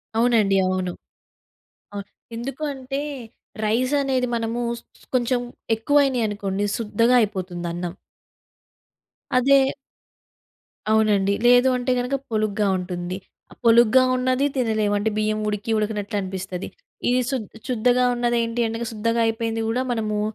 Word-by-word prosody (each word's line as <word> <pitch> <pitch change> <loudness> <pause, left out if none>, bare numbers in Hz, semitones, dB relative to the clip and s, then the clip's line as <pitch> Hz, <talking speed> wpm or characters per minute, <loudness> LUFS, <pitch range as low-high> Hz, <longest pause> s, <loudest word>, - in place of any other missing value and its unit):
అవునండి. 225 -4 +3
అవును. 185 -1 -1 1.0
అవును. 200 -1 -6 0.3
ఎందుకు 270 +5 -5
అంటే, 270 +1 -4 0.6
రైసనేది 255 +3 +1
మనమూ 230 +1 -2 0.2
స్ - - -23 0.2
స్ - - -20
కొంచెం 245 0 +2 0.4
ఎక్కువైనియి 270 0 +2
అనుకోండి 205 -1 -2
శుద్దగా 230 +2 +2
అయిపోతుందన్నం. 175 -3 -3 1.4
అదే 275 +2 +5 1.3
అవునండి. 205 -2 +3
లేదు 245 +1 +6
అంటే 250 +1 -1
గనక, 250 +3 -1 0.2
పొలుగ్గా 215 -1 0
ఉంటుంది. 180 0 -4 0.3
ఆహ్, - - -15
పొలుగ్గా 235 +2 +6
ఉన్నదీ 255 +2 +1
తినలేం, 220 -4 +1
అంటే 215 +2 0
బియ్యం 215 0 0
ఉడికి 210 +2 -3
ఉడికనట్లనిపిస్తది. 200 -3 -3 0.4
ఇది 250 +1 +3
శుద్ 255 -7 -2 0.2
శుద్దగా 250 +1 +3
ఉన్నదేంటి 240 -1 0
అంటగా, 230 +1 -4
శుద్ధగా 230 +2 0
అయిపోయింది 225 0 -1
గూడా 250 +3 0
మనమూ, 215 -3 -1
225 Hz, 110 wpm, -23 LUFS, 205-245 Hz, 1.4 s, లేదు